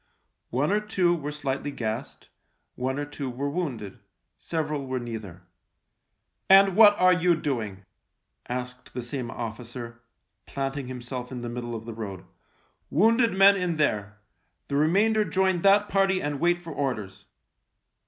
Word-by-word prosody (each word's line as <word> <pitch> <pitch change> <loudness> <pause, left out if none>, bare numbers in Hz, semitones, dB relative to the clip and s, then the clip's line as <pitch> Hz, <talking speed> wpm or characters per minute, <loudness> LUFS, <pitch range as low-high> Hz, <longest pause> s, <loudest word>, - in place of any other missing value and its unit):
One 140 +8 0
or 210 - +3
two 190 -5 +1
were 150 -3 -4
slightly 145 -1 -3
gassed; 120 -1 -5 0.4
one 130 +2 -2
or 145 - -2
two 145 -2 -5
were 140 +3 -3
wounded; 130 - -4 0.4
several 150 -4 -3
were 130 0 -2
neither. 110 -7 -7 0.5
" - - -52
And 195 -1 +7
what 210 -1 +7
are 185 0 +6
you 180 -1 +3
doing? 110 -11 -3 0.3
" - - -54 0.3
asked 125 0 -6
the 125 - -3
same 120 0 -4
officer, 120 +1 -7 0.5
planting 135 -1 -3
himself 125 0 -6
in 125 -2 -5
the 120 - -4
middle 120 0 -5
of 110 0 -7
the 115 - -6
road. 100 -4 -7 0.3
" - - -40
Wounded 225 - +3
men 195 +1 +7
in 180 -3 -1
there! 105 -9 0 0.5
The 140 - -1
remainder 200 +9 +3
join 190 -3 +1
that 200 +2 +5
party 195 -1 +2
and 145 -3 -3
wait 175 +1 +3
for 170 -2 -9
orders 105 -9 -3
140 Hz, 155 wpm, -26 LUFS, 120-180 Hz, 0.5 s, And